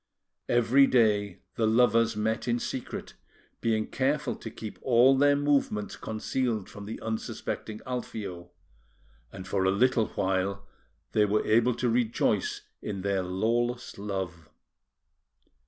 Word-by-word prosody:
Every 120 Hz, +4 st, +5 dB
day 105 Hz, -5 st, +2 dB
the 110 Hz, -, +1 dB
lovers 115 Hz, 0 st, +3 dB
met 110 Hz, +3 st, -1 dB
in 120 Hz, 0 st, +2 dB
secret, 125 Hz, +1 st, -5 dB, 0.5 s
being 110 Hz, -1 st, +1 dB
careful 140 Hz, +1 st, -1 dB
to 115 Hz, -, -7 dB
keep 110 Hz, -1 st, -8 dB
all 130 Hz, +2 st, +5 dB
their 145 Hz, +1 st, +4 dB
movements 140 Hz, -8 st, 0 dB
concealed 110 Hz, -1 st, -2 dB
from 100 Hz, 0 st, -10 dB
the 110 Hz, -, -6 dB
unsuspecting 110 Hz, -1 st, -4 dB
Alfio; 100 Hz, -8 st, -5 dB, 0.8 s
and 95 Hz, 0 st, -9 dB
for 95 Hz, 0 st, 0 dB
a 95 Hz, -, +3 dB
little 115 Hz, +3 st, +3 dB
while 95 Hz, +1 st, -1 dB, 0.5 s
they 105 Hz, -, +3 dB
were 105 Hz, +1 st, +1 dB
able 115 Hz, +2 st, +3 dB
to 125 Hz, -, -1 dB
rejoice 120 Hz, 0 st, +1 dB, 0.2 s
in 100 Hz, -3 st, -5 dB
their 100 Hz, -1 st, +1 dB
lawless 115 Hz, +6 st, -1 dB
love. 95 Hz, -5 st, -5 dB
110 Hz, 125 wpm, -28 LUFS, 100-120 Hz, 0.8 s, Every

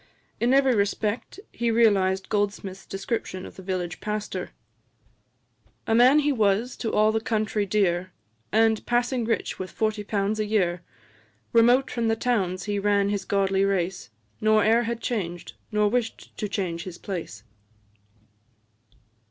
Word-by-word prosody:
In 240 Hz, +2 st, +2 dB
every 270 Hz, -1 st, +4 dB
respect 210 Hz, -, -1 dB
he 235 Hz, 0 st, -1 dB
realised 195 Hz, -5 st, +3 dB
Goldsmith's 200 Hz, -2 st, -2 dB
description 195 Hz, -2 st, -4 dB
of -, -, -11 dB
the -, -, -10 dB
village 180 Hz, -2 st, -3 dB
pastor: 210 Hz, 0 st, -4 dB, 1.4 s
"A 225 Hz, -, 0 dB
man 250 Hz, +5 st, +6 dB
he 295 Hz, 0 st, +1 dB
was 220 Hz, 0 st, +1 dB
to 225 Hz, -, -2 dB
all 215 Hz, +1 st, +3 dB
the 220 Hz, 0 st, 0 dB
country 215 Hz, -2 st, -1 dB
dear, 185 Hz, -2 st, +1 dB, 0.4 s
And 220 Hz, 0 st, +3 dB
passing 240 Hz, 0 st, +1 dB
rich 225 Hz, -, -2 dB
with 185 Hz, 0 st, -4 dB
forty 215 Hz, -1 st, -1 dB
pounds 205 Hz, +1 st, -1 dB
a 215 Hz, -, +1 dB
year; 180 Hz, -5 st, +1 dB, 0.7 s
Remote 245 Hz, +3 st, +4 dB
from 235 Hz, -2 st, 0 dB
towns 195 Hz, -6 st, -1 dB
he 205 Hz, 0 st, -2 dB
ran 200 Hz, 0 st, +2 dB
his 200 Hz, -1 st, -2 dB
godly 195 Hz, -1 st, +1 dB
race, 190 Hz, -7 st, -1 dB, 0.3 s
Nor 215 Hz, -1 st, +4 dB
e'er 225 Hz, +2 st, +4 dB
had 235 Hz, 0 st, -3 dB
changed, 175 Hz, -9 st, -3 dB, 0.2 s
nor 210 Hz, -1 st, +2 dB
wish'd 230 Hz, +1 st, -3 dB
to 210 Hz, -, -4 dB
change 175 Hz, -4 st, -2 dB
his 180 Hz, -2 st, -8 dB
place." 165 Hz, -, -6 dB
210 Hz, 145 wpm, -25 LUFS, 195-225 Hz, 1.4 s, man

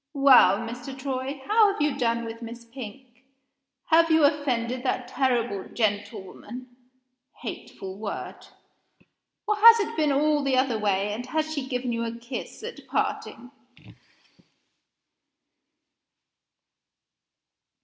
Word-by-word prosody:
Well, 265 Hz, -9 st, +7 dB
Mr. 245 Hz, +4 st, -7 dB
Troy, 265 Hz, +1 st, -4 dB
how 430 Hz, -1 st, +5 dB
have 395 Hz, -, -7 dB
you 295 Hz, -2 st, +1 dB
done 235 Hz, -3 st, 0 dB
with 230 Hz, +1 st, -8 dB
Miss 235 Hz, 0 st, -9 dB
Pink? 245 Hz, +1 st, -11 dB, 0.7 s
Have 330 Hz, +1 st, +5 dB
you 320 Hz, -1 st, +4 dB
offended 255 Hz, -5 st, +1 dB
that 255 Hz, -1 st, -2 dB
terrible 240 Hz, -7 st, -1 dB
'gentlewoman' 220 Hz, +3 st, -4 dB, 0.7 s
(hateful 190 Hz, -1 st, -7 dB
word!); 210 Hz, -2 st, -6 dB, 1.0 s
or 420 Hz, -, +2 dB
has 455 Hz, +2 st, +9 dB
it 420 Hz, -, -2 dB
been 305 Hz, -2 st, +2 dB
all 295 Hz, +1 st, +2 dB
the 270 Hz, -2 st, +1 dB
other 255 Hz, -4 st, +1 dB
way, 205 Hz, 0 st, 0 dB
and 245 Hz, +4 st, -6 dB
has 315 Hz, +2 st, -1 dB
she 285 Hz, -4 st, -4 dB
given 250 Hz, -2 st, -2 dB
you 230 Hz, 0 st, -2 dB
a 230 Hz, 0 st, -4 dB
kiss 240 Hz, -, -7 dB
at 470 Hz, +1 st, -8 dB
parting?" 245 Hz, +3 st, -3 dB
255 Hz, 120 wpm, -26 LUFS, 230-285 Hz, 1.0 s, has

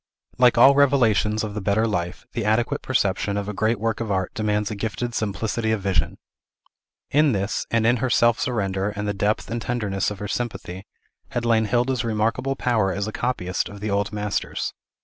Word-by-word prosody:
Like 125 Hz, -1 st, +5 dB
all 135 Hz, +4 st, +8 dB
revelations 115 Hz, -7 st, +3 dB
of 105 Hz, -1 st, -4 dB
the 105 Hz, -, -4 dB
better 100 Hz, +3 st, +2 dB
life, 90 Hz, -5 st, -3 dB
the 115 Hz, -, -2 dB
adequate 120 Hz, +7 st, +1 dB
perception 100 Hz, -4 st, 0 dB
of 100 Hz, 0 st, -3 dB
a 105 Hz, -, -3 dB
great 110 Hz, +2 st, 0 dB
work 115 Hz, 0 st, -1 dB
of 115 Hz, -2 st, -3 dB
art 95 Hz, -1 st, -1 dB
demands 105 Hz, -1 st, -1 dB
a -, -, -3 dB
gifted 110 Hz, +3 st, -3 dB
simplicity 110 Hz, +2 st, -1 dB
of 110 Hz, -2 st, 0 dB
vision. 95 Hz, -2 st, 0 dB, 0.9 s
In 150 Hz, -1 st, +4 dB
this, 100 Hz, 0 st, -2 dB
and 115 Hz, -1 st, +1 dB
in 120 Hz, +2 st, +4 dB
her 130 Hz, +2 st, -1 dB
self 120 Hz, 0 st, +3 dB
surrender, 100 Hz, -5 st, -1 dB
and 105 Hz, 0 st, -4 dB
the 105 Hz, -, 0 dB
depth 105 Hz, +3 st, -1 dB
and 120 Hz, 0 st, -2 dB
tenderness 105 Hz, -6 st, -1 dB
of 105 Hz, -, -6 dB
her 105 Hz, -, -5 dB
sympathy, 100 Hz, -5 st, -4 dB, 0.4 s
had 120 Hz, 0 st, -2 dB
lain 115 Hz, -1 st, +3 dB
Hilda's 125 Hz, +2 st, +1 dB
remarkable 115 Hz, +4 st, 0 dB
power 110 Hz, -7 st, +1 dB
as 100 Hz, +2 st, -2 dB
a -, -, -3 dB
copyist 100 Hz, -7 st, -2 dB
of 105 Hz, -, -10 dB
the 105 Hz, 0 st, -3 dB
old 100 Hz, +1 st, 0 dB
masters. 105 Hz, -1 st, -2 dB
110 Hz, 195 wpm, -23 LUFS, 100-120 Hz, 0.9 s, all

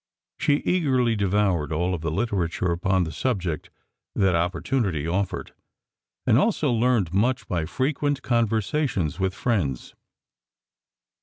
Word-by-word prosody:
She 145 Hz, 0 st, +2 dB
eagerly 130 Hz, -10 st, +2 dB
devoured 100 Hz, -6 st, +1 dB
all 85 Hz, +4 st, 0 dB
of 85 Hz, -, -3 dB
the 80 Hz, -, -1 dB
literature 90 Hz, -2 st, -1 dB
upon 95 Hz, +2 st, +1 dB
the 80 Hz, -, -4 dB
subject 90 Hz, -, -2 dB, 0.5 s
that 95 Hz, -2 st, +3 dB
opportunity 90 Hz, -, 0 dB
offered, 95 Hz, +3 st, -2 dB, 0.7 s
and 115 Hz, -, +5 dB
also 155 Hz, -, +1 dB
learned 115 Hz, -7 st, +2 dB
much 120 Hz, +5 st, +1 dB
by 85 Hz, -3 st, -1 dB
frequent 140 Hz, -, -1 dB
conversations 115 Hz, -, 0 dB
with 95 Hz, -1 st, 0 dB
friends. 95 Hz, -, -1 dB
100 Hz, 120 wpm, -25 LUFS, 85-125 Hz, 0.7 s, and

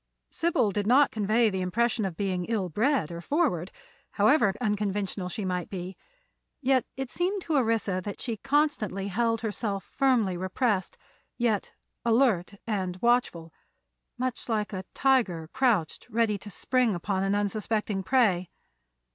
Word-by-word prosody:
Sybil 325 Hz, -11 st, +1 dB
did 205 Hz, +1 st, -2 dB
not 275 Hz, +5 st, +5 dB
convey 220 Hz, +1 st, +2 dB
the 190 Hz, -1 st, -2 dB
impression 225 Hz, +4 st, 0 dB
of 180 Hz, -4 st, -4 dB
being 185 Hz, -3 st, -1 dB
ill 205 Hz, -4 st, -1 dB
bred 225 Hz, -, +1 dB
or 170 Hz, 0 st, -6 dB
forward, 195 Hz, -, 0 dB, 0.4 s
however 215 Hz, 0 st, +4 dB
unconventional 205 Hz, -4 st, -1 dB
she 205 Hz, +2 st, -4 dB
might 180 Hz, -2 st, -2 dB
be; 185 Hz, 0 st, -6 dB, 0.6 s
yet 260 Hz, -2 st, +2 dB
it 270 Hz, -2 st, -4 dB
seemed 375 Hz, +2 st, -1 dB
to 325 Hz, -, -2 dB
Orissa 225 Hz, -7 st, +1 dB
that 205 Hz, 0 st, -6 dB
she 230 Hz, -3 st, -3 dB
constantly 270 Hz, -8 st, 0 dB
held 230 Hz, +2 st, 0 dB
herself 205 Hz, -3 st, -3 dB
firmly 240 Hz, -9 st, +2 dB
repressed, 190 Hz, +2 st, -1 dB, 0.4 s
yet 225 Hz, -4 st, 0 dB, 0.3 s
alert 225 Hz, -6 st, +2 dB
and 190 Hz, -5 st, -2 dB
watchful, 210 Hz, -9 st, +1 dB, 0.6 s
much 255 Hz, 0 st, -3 dB
like 215 Hz, -2 st, -1 dB
a 190 Hz, -1 st, -4 dB
tiger 210 Hz, -13 st, +2 dB
crouched 225 Hz, -, +1 dB
ready 220 Hz, -3 st, +1 dB
to 205 Hz, -, -9 dB
spring 250 Hz, +1 st, +1 dB
upon 190 Hz, +2 st, -1 dB
an 195 Hz, +1 st, +1 dB
unsuspecting 210 Hz, 0 st, -1 dB
prey. 190 Hz, -5 st, +2 dB
210 Hz, 140 wpm, -27 LUFS, 190-245 Hz, 0.6 s, not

